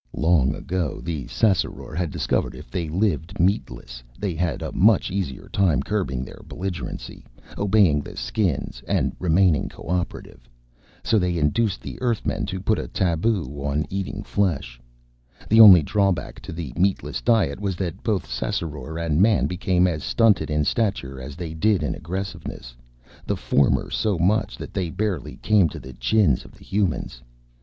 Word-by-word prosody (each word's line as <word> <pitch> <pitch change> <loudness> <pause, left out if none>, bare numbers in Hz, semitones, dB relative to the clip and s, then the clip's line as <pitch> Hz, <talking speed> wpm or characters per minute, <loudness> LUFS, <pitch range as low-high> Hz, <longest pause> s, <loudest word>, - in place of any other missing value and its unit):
Long 75 -4 +3
ago 90 -4 -3
the 80 -6 -4
Ssassaror 100 -6 0
had 90 -1 -1
discovered - - -1
that - - -11
if - - -12
they 85 -3 -2
lived 95 +1 -1
meatless, 75 - -1 0.2
they 100 -4 -2
had 85 +1 -2
a - - -4
much 105 0 +3
easier 95 -9 -3
time 85 -9 +2
curbing 80 -11 -2
their - - -12
belligerency, 95 -2 -6 0.3
obeying 100 -7 +3
the - - -10
Skins 80 - -2
and - - 0
remaining 90 -2 +3
cooperative. 85 -8 -5 0.5
So 110 - +3
they 90 -2 0
induced 95 +7 +1
the - - -8
Earthmen 120 -4 -1
to 95 0 -4
put 105 +3 +1
a - - -4
taboo 90 +1 0 0.2
on 70 +2 0
eating 95 -1 -3
flesh. 70 -12 -1 0.7
The 110 +1 +7
only 95 -7 +10
drawback 100 +2 0
to - - -8
the 80 -6 -6
meatless 95 +2 0
diet 110 - +2
was 100 -3 -2
that 85 -3 -4
both 105 -4 0
Ssassaror 75 +4 -4
and 85 -1 +1
Man 105 0 +4
became 90 0 +1
as 85 -4 -1
stunted 115 -7 +3
in 75 -1 +1
stature 70 - -1
as 70 +3 -8
they 85 -1 -6
did 90 +2 +2
in 75 - -1
aggressiveness, 90 -8 -6 0.5
the - - 0
former 70 -1 +1
so 105 -4 0
much 95 +6 +1
so - - -11
that - - -10
they 90 -3 -1
barely 95 -3 -3
came 105 -6 +3
to - - -8
the 65 +1 -10
chins 70 - +2
of - - -15
the - - -17
Humans. 95 -11 -1
90 Hz, 165 wpm, -23 LUFS, 75-100 Hz, 0.7 s, only